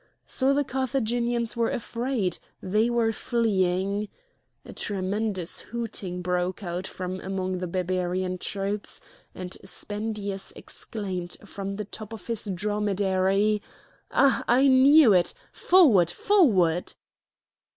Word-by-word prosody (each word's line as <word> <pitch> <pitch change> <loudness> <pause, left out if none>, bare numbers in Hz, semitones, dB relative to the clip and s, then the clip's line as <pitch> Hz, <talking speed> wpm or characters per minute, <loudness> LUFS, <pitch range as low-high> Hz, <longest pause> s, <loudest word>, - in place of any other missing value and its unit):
So 265 0 +1
the 285 +1 +2
Carthaginians 240 -3 -1
were 230 -1 +1
afraid, 235 -6 -2 0.2
they 215 +5 +1
were 235 -2 +2
fleeing! 200 -3 0 0.6
A - - -10
tremendous 195 -2 -1
hooting 205 -6 -5
broke 180 +2 -1
out 180 +1 -3
from 185 0 -5
among 185 -1 -3
the 180 - -3
Barbarian 185 +1 -1
troops, 200 +2 -3 0.4
and 185 0 -6
Spendius 205 0 -4
exclaimed 185 -5 -6
from 195 0 -5
the 210 +1 -4
top 215 +2 -8
of 225 - -9
his 230 -2 -1
dromedary: 200 +1 +1 0.5
"Ah! 275 -3 +3
I 260 +4 +5
knew 270 -1 +7
it! 175 -2 +2 0.2
Forward! 255 - +5
forward!" 185 - +3
205 Hz, 110 wpm, -26 LUFS, 185-230 Hz, 0.6 s, knew